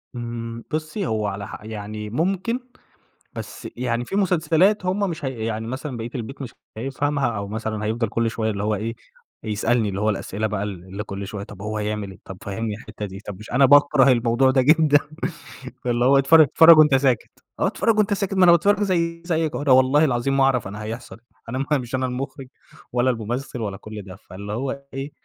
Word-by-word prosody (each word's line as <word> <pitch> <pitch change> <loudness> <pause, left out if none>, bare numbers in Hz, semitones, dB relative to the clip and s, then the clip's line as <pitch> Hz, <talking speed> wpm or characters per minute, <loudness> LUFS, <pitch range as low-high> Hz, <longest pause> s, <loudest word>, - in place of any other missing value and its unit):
إمم، 115 -1 -5
بُصي 155 +6 -2
هو 110 -1 -1
على 100 0 -4
ح - - -9
يعني 105 0 -6
ممكن، 190 - -1 0.7
بس - - -7
يعني 120 -1 -1
في 195 - -5
مسلسلات 185 +1 +2
هُم 195 +2 0
مش 160 -4 -5
هي 125 -4 -3
يعني 110 0 -3
مثلًا 130 +1 -5
بقية 115 +1 -5
البيت 130 +3 -6
مش 125 -4 -7 0.2
هيفهمها، 135 +3 -1
أو 100 0 -4
مثلًا 110 0 -3
هيِفضَل 115 +1 -1
كل 115 +1 0
شوية 110 -1 -1
اللي 100 -1 -3
هو 105 0 +1
إيه 115 +3 -4 0.5
يسألني 110 +1 +1
اللي 95 +1 -3
هو 110 - +2
الأسئلة 105 +1 -2
بَقى 105 -1 -2
ال 95 -4 -6
اللي 95 +2 -6
كُل 100 -1 -6
شوية 100 0 -6
طَب 100 -1 -11
هو 110 +1 -3
هيعمل 105 -1 -3
إيه؟ 95 - -14
طب 95 - -8
فهمني 105 +2 -3
الحتة 105 -1 -8
دي، 95 -1 -8
طَب 100 -2 -6
مش 105 - -11
أنا 130 +3 +5
باكره 145 -1 +6
الموضوع 120 +2 +3
ده 130 0 +3
جدًا 150 +1 +5 0.9
اللي 120 0 +1
هو 135 +2 +6
اتفر 150 +4 +7
اتفرج 160 +3 +7
وأنت 150 -3 +6
ساكت 130 -3 +2 0.3
آه، - - +2
اتفرج 225 -2 +1
وأنت 210 -1 +3
ساكت 195 -1 -2
ما 190 -1 +4
أنا 175 - +8
باتفرج 200 +5 +4
زَيِّ 170 -3 0
زَيك 160 -3 0
أهو - - -3
أنا 145 -2 +1
والله 130 +4 +5
العظيم 135 0 0
ما 135 - +4
أعرف 130 -5 +2
أنا 105 +2 -7
هيحصل 115 +3 -7 0.3
أنا 130 +3 -2
مش 130 -3 -1
أنا 130 0 0
المخرج 130 +2 -5 0.5
ولا 125 +1 +2
الممثل 120 +2 -3
ولا 100 -3 -3
كل 110 0 -8
ده، 95 -2 -10
فاللي 100 +2 -8
هو 135 +4 -3
إيه 135 +2 -5
120 Hz, 205 wpm, -23 LUFS, 110-145 Hz, 0.9 s, أنا